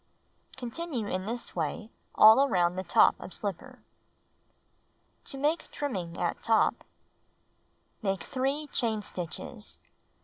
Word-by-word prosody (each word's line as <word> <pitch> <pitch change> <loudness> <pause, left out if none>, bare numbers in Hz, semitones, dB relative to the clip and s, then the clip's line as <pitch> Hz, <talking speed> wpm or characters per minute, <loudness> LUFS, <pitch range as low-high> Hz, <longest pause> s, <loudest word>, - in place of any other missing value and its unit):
Continue 255 0 -4
in 185 0 -3
this 235 +1 -4
way 180 +7 -3 0.2
all 220 +5 +8
around 180 -9 +2
top - - +6
of 180 - -7
slipper. 200 -5 -6 1.4
To 275 - -4
Make 300 +4 0
Trimming 185 -13 -4
at 175 - -1
Top 225 -1 +2 1.2
Make 195 -3 -1
3 275 +4 -1
chain 220 -3 0
stitches. 175 -4 -6
220 Hz, 105 wpm, -29 LUFS, 185-270 Hz, 1.4 s, all